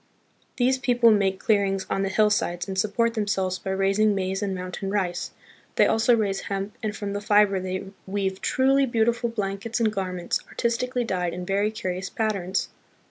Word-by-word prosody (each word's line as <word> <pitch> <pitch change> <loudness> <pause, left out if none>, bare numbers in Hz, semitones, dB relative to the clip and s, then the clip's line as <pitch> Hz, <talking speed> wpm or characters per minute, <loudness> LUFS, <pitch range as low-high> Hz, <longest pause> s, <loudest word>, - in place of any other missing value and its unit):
These 260 +1 +2
people 240 -2 +4
make 195 -2 +2
clearings 195 -3 +1
on 195 - -1
the 195 - 0
hillsides 205 -4 +1
and 190 - -4
support 215 +4 +1
themselves 195 -4 -1
by 195 - -6
raising 195 +2 +2
maize 190 0 -2
and 195 -2 -1
mountain 185 +2 -5
rice. 185 -3 -1 0.5
They - - +5
also 230 +2 +4
raise 200 -3 0
hemp, 195 +1 -3
and 215 -1 -3
from 200 -2 -4
the 205 - -3
fiber 205 -2 +4
they 185 +1 -3 0.2
weave 190 -1 -2
truly 270 +1 +3
beautiful 235 0 +1
blankets 210 +1 -3
and 220 -2 +2
garments, 185 -3 -2
artistically 245 +1 -1
dyed 180 -6 -2
in 180 0 -5
very 200 +3 +1
curious 190 -4 -4
patterns. 195 -4 -1
200 Hz, 170 wpm, -25 LUFS, 190-225 Hz, 0.5 s, They